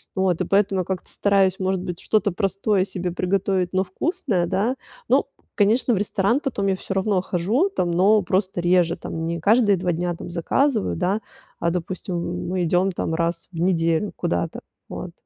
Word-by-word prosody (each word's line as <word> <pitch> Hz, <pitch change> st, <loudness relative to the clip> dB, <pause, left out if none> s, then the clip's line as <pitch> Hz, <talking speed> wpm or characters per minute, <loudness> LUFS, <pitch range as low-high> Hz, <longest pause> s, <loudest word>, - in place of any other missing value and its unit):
Вот, 190 Hz, -3 st, +1 dB
и -, -, +1 dB
поэтому 195 Hz, -1 st, +2 dB
я -, -, -5 dB
как-то 190 Hz, -2 st, -4 dB
стараюсь, 195 Hz, -2 st, +2 dB
может 190 Hz, -1 st, 0 dB
быть, 175 Hz, -2 st, -5 dB
что-то 210 Hz, -2 st, +1 dB
простое 195 Hz, +1 st, 0 dB
себе 180 Hz, -2 st, -3 dB
приготовить, 185 Hz, 0 st, 0 dB
но 190 Hz, -, +2 dB
вкусное, 195 Hz, -, -1 dB
да. 205 Hz, +8 st, 0 dB, 0.3 s
Ну, -, -, +4 dB, 0.3 s
конечно, 225 Hz, +4 st, +3 dB
в -, -, +1 dB
ресторан 205 Hz, +4 st, +1 dB
потом 230 Hz, -9 st, -2 dB
я 195 Hz, -, +2 dB
всё 195 Hz, -, -5 dB
равно 195 Hz, -1 st, +1 dB
хожу 200 Hz, -, +1 dB
там, 180 Hz, -, -1 dB
но 200 Hz, +5 st, +4 dB
просто 185 Hz, -1 st, -1 dB
реже 175 Hz, -1 st, +3 dB
там, 165 Hz, -2 st, -5 dB
не 170 Hz, 0 st, -2 dB
каждые 210 Hz, -1 st, +4 dB
2 180 Hz, 0 st, -1 dB
дня 175 Hz, +1 st, -2 dB
там 170 Hz, -, -8 dB
заказываю, 220 Hz, -, +1 dB
да, 185 Hz, +4 st, 0 dB, 0.4 s
а 170 Hz, -, +1 dB
допустим, 175 Hz, 0 st, -4 dB
мы 185 Hz, -1 st, 0 dB
идём 180 Hz, +3 st, +2 dB
там 165 Hz, -, -2 dB
раз 170 Hz, 0 st, -2 dB
в 165 Hz, -, -7 dB
неделю 165 Hz, +1 st, +1 dB
куда-то. 85 Hz, 0 st, -2 dB, 0.3 s
Вот. -, -, -6 dB
185 Hz, 180 wpm, -23 LUFS, 175-200 Hz, 0.4 s, Ну